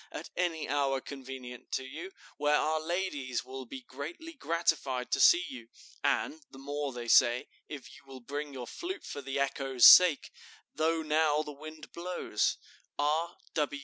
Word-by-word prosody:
at - - -8
any 170 -3 -1
hour 140 -1 +1
convenient 130 -2 -9
to 130 - -1
you, 160 +8 -7 0.3
where 150 0 +3
our 155 0 0
ladies 155 -8 -2
will 130 0 -7
be 130 +2 -8
greatly 165 - -7
gratified 165 - -1
to - - +1
see 175 +1 +7
you? 120 -3 -9 0.4
and 155 - 0
the - - -14
more, 145 +1 -3
they 120 -1 -7
say, 120 +1 +5 0.2
if 145 -4 -7
you - - -15
will 135 -1 -10
bring 145 +4 -5
your 130 -3 -6
flute 365 - -6
for 145 - -6
the 135 +1 -3
echo's 135 -2 +2
sake, 180 -5 +8 0.4
though 160 +1 +1
now 155 0 +2
the 150 - -7
wind 155 +1 -10
blows. 175 -10 -1 0.4
"R. 155 +4 0
145 Hz, 160 wpm, -31 LUFS, 130-160 Hz, 0.4 s, sake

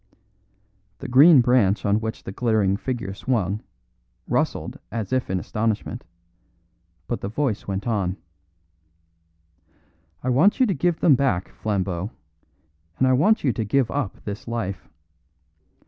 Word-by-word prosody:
The 135 - -7
green 135 +3 +7
branch 120 -5 +2
on 100 +1 +2
which 110 0 -5
the - - -6
glittering 105 -3 +1
figure 115 -3 -4
swung, 105 -3 -1 0.7
rustled - - -1
as 110 0 -3
if 130 0 0
in 95 0 0
astonishment; 110 +3 -3 1.0
but 120 - -4
the 100 - -3
voice 115 -2 -2
went 95 0 -3
on: 100 -5 -1 2.1
"I 130 - -1
want 165 - +4
you 260 - +5
to 205 - 0
give 170 +2 0
them 155 - +6
back, 130 -9 +1
Flambeau, 95 -2 -2 0.9
and 130 - +3
I 130 - +4
want 205 +12 +3
you 130 -5 +2
to 115 - -2
give 120 +3 +1
up 140 -9 -3
this 105 +4 -6
life. 100 -5 -4
115 Hz, 135 wpm, -23 LUFS, 100-130 Hz, 2.1 s, green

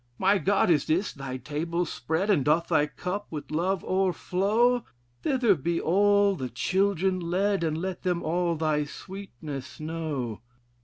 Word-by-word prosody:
"'My 195 +1 +3
God! 195 -2 +3
and 150 -1 +2
is 180 +6 +1
thy 135 -2 -5
table 165 +6 -2
spread; 165 +5 -1
And 160 -9 +3
doth 155 +4 +2
thy 150 -3 +3
cup 190 +6 -4
with 150 -2 -7
love 180 +4 0
o'erflow? 195 +6 +2 0.4
Thither 250 -6 +3
be 170 +1 -1
all 200 +3 +3
the 130 -7 -4
children 190 - +1
led, 185 +2 0
And 155 -1 0
let 185 +2 -4
them 180 -2 -1
all 170 +1 0
thy 155 -1 +1
sweetness 150 -6 -8
know.' 155 -8 -4
175 Hz, 150 wpm, -27 LUFS, 155-195 Hz, 0.4 s, My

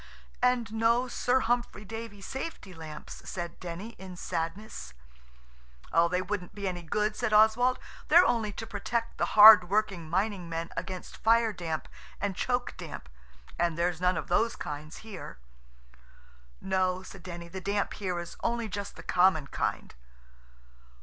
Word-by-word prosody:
"And 245 -3 +2
no 230 +3 +3
Sir 250 +1 +1
Humphry 240 -3 -1
Davy 225 -1 -7
safety 265 - -6
lamps," 155 -2 -9
said 175 -2 -5
Denny 180 +5 -6
in 185 -1 -9
sadness. 165 - -4 1.1
"They 180 +1 0
wouldn't 195 -1 -4
be 200 -1 -3
any 180 -2 -3
good," 210 +6 -1
said 235 -3 -1
Oswald; 220 +4 +5 0.3
"they're 345 +4 +7
only 225 -3 +1
to 225 - -6
protect 230 +2 -3
the - - -1
hard 205 -4 +11
working 195 -6 0
mining 190 0 -1
men 165 0 -4
against 180 +1 -6
fire 230 0 +3
damp 160 -4 -4 0.3
and 200 -1 -2
choke 245 +5 -1
damp. 60 - -8 0.5
And 170 -2 +1
there's 175 0 0
none 180 -1 +2
of 155 - -4
those 230 +6 +2
kinds 150 +1 -6
here." 200 - -8 1.2
"No," 185 -1 0
said 195 0 -11
Denny, 170 -1 -7
"the 185 +2 -7
damp 200 +2 -1
here 185 -3 -3
is 175 0 -6
only 235 -1 -1
just 200 0 -5
the - - -10
common 180 -5 +3
kind." - - -3
195 Hz, 150 wpm, -29 LUFS, 175-225 Hz, 1.2 s, hard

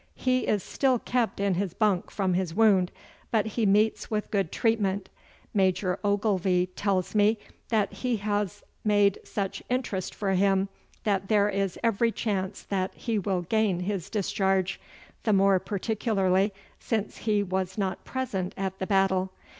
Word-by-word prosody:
He 255 0 +1
is 205 -4 +1
still 265 -2 +1
kept 240 -2 -1
in 200 -1 +2
his 185 -1 -2
bunk 205 -5 +1
from 190 -3 0
his 175 -2 -1
wound, 195 -4 +4 0.4
but 220 -3 +2
he 220 0 0
meets 210 +3 +2
with 210 -1 -2
good 195 -5 0
treatment. 205 -4 0 0.4
Major 185 -2 +1
Ogilvy 195 -3 +1
tells 195 -3 0
me 210 +1 +4 0.3
that 220 -3 +1
he 250 -3 -1
has 205 -2 -2 0.2
made 205 -2 +3
such 195 -2 -3
interest 245 -7 -2
for 200 -2 -1
him 195 +1 +2 0.3
that 195 -2 0
there 205 -1 +3
is 195 -2 -1
every 230 0 +2
chance 200 -4 -2
that 190 -1 -2
he 225 -3 -1
will 185 -2 -1
gain 200 -1 +1
his 195 -1 -3
discharge, 195 -2 0 0.4
the 215 - +2
more 195 -1 +5
particularly 200 -1 +1 0.3
since 220 -3 -2
he 210 -2 +1
was 190 0 -2
not 190 -3 -2
present 205 -9 -3
at 190 -1 -3
the 190 - -2
battle. 190 -1 +2
200 Hz, 155 wpm, -27 LUFS, 190-215 Hz, 0.4 s, more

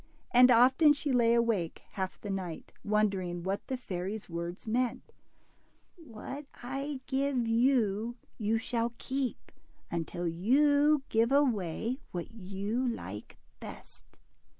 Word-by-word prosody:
And 250 +1 +7
often 260 +6 +6
she 290 0 -2
lay 235 -1 +4
awake 225 -8 0
half 190 -1 -4
the 205 - -5
night, 185 -4 -5
wondering 195 -5 0
what 195 +2 -3
the 260 - -2
fairy's 195 -2 -5
words 170 +4 -5
meant: 245 +2 -1 0.8
What 275 -1 -8 0.2
I 275 +2 -4
give 265 -3 0
you, 230 -2 +2 0.2
you 220 +1 +1
shall 235 +1 -1
keep, 265 -1 -3 0.4
until 170 +1 -2
you 285 - +3
give 225 +2 +2
away 240 - +1
what 175 -2 -5
you 210 +4 -3
like 105 - -6 0.2
best.'' - - -11
230 Hz, 120 wpm, -31 LUFS, 195-260 Hz, 0.8 s, And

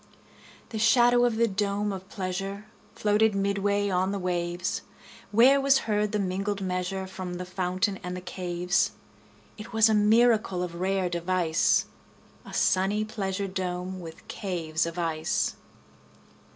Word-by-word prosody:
30 - - -29 0.6
The 220 - -4
shadow 240 +2 +5
of 240 -2 +1
the 230 +1 +3
dome 200 0 -1
of 190 0 -8
pleasure 195 +1 -4 0.3
Floated 210 0 +2
midway 200 +1 +1
on 185 0 +1
the 200 - -2
waves; 175 -1 -2 0.5
Where 255 +6 +5
was 275 0 +4
heard 210 -1 0
the 210 - 0
mingled 195 +1 -2
measure 185 0 -2
From 185 -1 -6
the 180 +1 -5
fountain 185 +2 -1
and 180 -1 -5
the - - -6
caves. 180 - -1 0.7
It 215 - -9
was 220 0 +5
a - - +3
miracle 215 -3 +3
of 175 -1 -5
rare 190 0 +1
device, 170 -1 +1 0.6
35 - - -10
A - - -3
sunny 200 +3 +2
pleasure 200 -2 -3
dome 185 0 -4
with 165 -2 -11
caves 165 -5 -2
of 170 +1 -6
ice! 165 +3 -1
195 Hz, 150 wpm, -27 LUFS, 180-210 Hz, 0.7 s, shadow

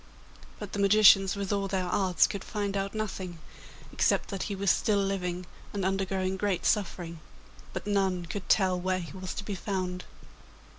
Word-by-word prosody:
But 210 -2 -8
the 205 - -2
magicians, 195 -1 +6
with 200 0 -2
all 200 -1 0
their 190 -1 -1
arts, 180 -2 +3
could 200 -2 -4
find 205 -2 -3
out 195 +1 -2
nothing, 190 -5 -4 0.6
except - - +2
that 195 -2 -4
he 200 - -2
was 195 -1 +3
still 210 -2 +2
living 185 -2 -1 0.3
and 200 -2 -2
undergoing 190 0 -1
great 195 -2 -1
suffering; 175 -5 0 0.5
but 185 - -5
none 190 -3 +1
could 185 +1 -6
tell 185 -3 +3
where 185 +1 0
he 175 -1 -7
was 185 0 -5
to - - -4
be 205 - -3
found. 185 -1 -3
195 Hz, 170 wpm, -29 LUFS, 185-200 Hz, 0.6 s, magicians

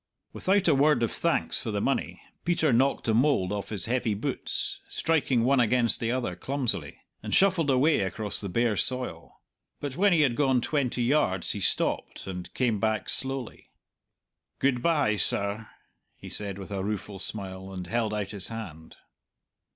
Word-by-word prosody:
Without 195 0 +1
a 160 - +5
word 145 -1 +3
of 115 - 0
thanks - - 0
for - - -4
the - - -1
money, - - -2 0.2
Peter 160 -5 +2
knocked 135 +4 +2
the 110 - +1
mould 115 -6 +2
off 100 -1 -4
his 100 -5 -1
heavy 120 -3 0
boots, 100 - -3
striking 135 -7 +1
one 135 +2 +3
against 120 0 +4
the 115 0 -1
other 120 -8 -2
clumsily, 130 +5 -2 0.2
and - - -1
shuffled 185 -6 +3
away 140 +4 +3
across 100 +2 -1
the 100 - -4
bare 115 +3 +1
soil. 125 -8 0 0.4
But 145 -1 -5
when 200 +2 +4
he 165 -3 +4
had 130 -5 +2
gone 135 -2 +2
twenty 125 -2 -1
yards 120 - +1
he 105 - -4
stopped, 95 - 0
and 90 -2 -7
came 120 -5 +1
back 110 0 -1
slowly. 135 -2 -3 0.9
"Good 130 -3 +1
bye, 145 -9 +2
sir," 100 +2 +1 0.5
he - - -11
said 100 -2 -3
with 100 0 -9
a 95 -1 -3
rueful 100 -1 -4
smile, 95 -1 -6
and 90 -2 -6
held 115 +3 -1
out 105 -2 -3
his 100 -4 -3
hand. 90 -9 -8
115 Hz, 170 wpm, -27 LUFS, 100-135 Hz, 0.9 s, a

